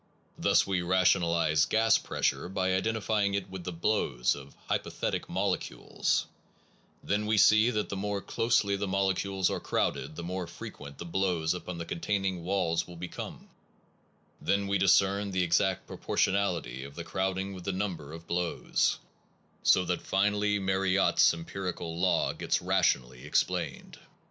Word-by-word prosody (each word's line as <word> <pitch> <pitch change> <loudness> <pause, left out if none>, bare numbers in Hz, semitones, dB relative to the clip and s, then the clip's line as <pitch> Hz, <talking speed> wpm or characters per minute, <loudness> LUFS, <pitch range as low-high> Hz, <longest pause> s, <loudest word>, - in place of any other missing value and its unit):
Thus - - +3
we 95 -2 0
rationalize 85 -3 +3
gas 110 0 +3
pressure 85 - -1
by 95 -1 0
identifying 105 0 0
it 100 -2 -3
with 95 -2 -6
the 90 - -3
blows 80 - +1
of 70 -1 -11
hypothetic - - -2
molecules; - - -1 0.8
then 105 +1 0
we 110 0 +2
see 110 +3 +6
that 105 -3 -1
the - - -3
more 100 +1 -2
closely 105 -1 +1
the 100 0 -2
molecules 95 0 0
are - - -2
crowded 75 +4 -1
the 85 - -6
more 90 0 -4
frequent 70 -3 -9
the - - -7
blows 85 -2 0
upon 90 0 -6
the 85 - -5
containing 95 +1 -2
walls 90 -3 0
will 90 - -10
be 90 +2 -6
come; - - -8 0.9
then 100 0 +1
we 100 0 0
discern 100 +1 +3
the 95 -1 0
exact 95 +2 +1
proportion - - 0
ality 85 -11 -1
of 70 +1 -10
the 85 - -5
crowding 95 +2 -2
with 90 -2 -9
the 95 - 0
number 90 -6 -4
of 85 +1 -9
blows; 85 0 0 0.6
so 90 - +4
that 90 0 -1
finally 105 +1 +1
Mariotte 95 0 +1
s - - +7
empirical 85 0 -5
law 90 0 +2
gets - - 0
rationally 60 0 +1
explained. 75 - -1
95 Hz, 155 wpm, -29 LUFS, 85-100 Hz, 0.9 s, s